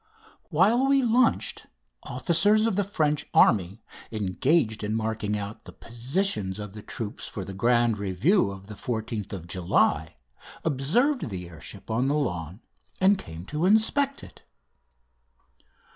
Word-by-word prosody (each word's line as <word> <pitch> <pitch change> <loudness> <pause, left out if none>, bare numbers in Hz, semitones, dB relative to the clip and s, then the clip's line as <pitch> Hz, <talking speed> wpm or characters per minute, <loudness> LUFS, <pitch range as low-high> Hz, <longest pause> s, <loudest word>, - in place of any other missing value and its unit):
While 210 - +3
we 275 -1 +4
lunched, 240 0 +1 0.3
officers 185 - +2
of 225 - +1
the 205 - +2
French 155 -7 -1
army 100 +1 +3 0.3
engaged 110 - 0
in 105 +1 -1
marking 110 -2 -2
out 100 +1 -7
the - - -10
positions 120 - -1
of 105 -2 -7
the 105 - -9
troops 105 0 -6
for 95 - -6
the 95 - -7
grand 120 +1 +2
review 100 - +2
of 95 0 -9
the 105 - -9
14th 110 -1 -4
of 90 -4 -6
July 85 -3 +1 0.5
observed 165 - +1
the 90 -3 -5
air 85 -1 -13
ship 100 +4 -9
on 120 +4 +1
the 145 - +1
lawn 90 - -3 0.4
and 195 +1 +4
came 80 +2 -8
to 155 - -1
inspect 270 +7 +2
it. - - -14
115 Hz, 145 wpm, -26 LUFS, -, 0.5 s, we